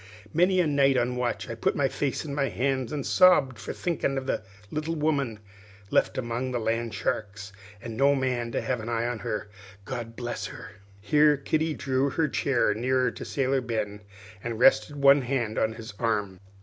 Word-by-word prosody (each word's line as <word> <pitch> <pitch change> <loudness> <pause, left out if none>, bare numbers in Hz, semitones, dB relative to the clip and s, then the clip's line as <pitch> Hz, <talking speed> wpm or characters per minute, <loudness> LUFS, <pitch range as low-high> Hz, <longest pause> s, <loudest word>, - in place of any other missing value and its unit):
Many 180 +3 +3
a 180 - +4
night 140 -3 +3
on 125 0 0
watch 125 -1 -2
I 115 - -4
put 115 - 0
my 140 - +2
face 140 +2 -2
in 145 - -5
my 140 -2 0
hands 130 +2 -1
and 145 -3 -3
sobbed 150 -10 +5
for - - -5
thinkin' 160 -5 -1
of 135 - -3
the - - -1 0.3
little 155 +2 -2
woman 145 -7 0 0.5
left - - +2
among 120 +1 -2
the 125 -1 -1
land 115 0 -1
sharks, 100 -1 -3 0.3
an' 115 -2 -6
no 140 +2 +4
man 125 -3 -1
to - - 0
have 125 -2 -1
an 110 +2 -6
eye 115 0 0
on 120 -2 -2
her, 105 +2 -3 0.4
God 120 -3 -5
bless 120 -3 -4
her!" - - -10 0.3
Here 150 +5 +4
Kitty 155 +3 0
softly - - -9
drew 135 +1 +2
her 160 +3 +1
chair 130 -5 +1
nearer 125 +2 +1
to - - -8
Sailor 135 -1 0
Ben, 110 -4 -3 0.4
and 120 -1 -3
rested 135 +4 +4
one 140 0 +6
hand 120 -4 -1
on 110 - +1
his 110 -2 -9
arm. 105 -5 -1
130 Hz, 195 wpm, -27 LUFS, 115-140 Hz, 0.5 s, one